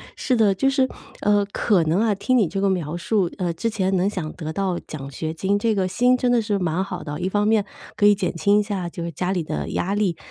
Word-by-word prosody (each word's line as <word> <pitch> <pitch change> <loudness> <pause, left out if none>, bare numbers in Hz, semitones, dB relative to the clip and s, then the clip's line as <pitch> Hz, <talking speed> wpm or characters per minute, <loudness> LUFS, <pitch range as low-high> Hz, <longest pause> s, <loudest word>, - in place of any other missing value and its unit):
是 255 - 0
的。 205 -3 +4
就 270 +8 +2
是， 270 -1 +2 0.3
呃， 205 0 +3
可 200 -6 +2
能 160 +5 +1
啊 220 -2 +2
听 255 +6 +1
你 205 -7 +3
这 195 +4 -3
个 200 - +3
描 170 -4 -2
述， 180 0 0
呃 180 -3 -1
之 230 +8 -2
前 195 -3 0
能 190 +3 +2
想 165 -6 -4
得 160 -2 -6
到 190 -2 -1
奖 140 -2 -8
学 160 +4 -4
金， 195 +5 0
这 225 0 +1
个 190 -2 +1
心 245 +7 +3
真 250 -1 +1
的 240 -2 +3
是 210 -1 -1
蛮 180 -1 -1
好 195 - -5
的 145 - -6
哦， - - -6
一 180 - -1
方 205 +2 +1
面 215 -1 +3 0.3
可 205 - +3
以 205 - +7
减 190 -3 -2
轻 205 +3 +3
一 - - +1
下 195 -4 -3
就 170 0 -6
是 170 - -4
家 180 +5 -2
里 175 -4 -1
的 - - -4
压 195 +3 -1
力， 200 -5 +1
195 Hz, 290 characters per minute, -23 LUFS, 175-210 Hz, 0.3 s, 以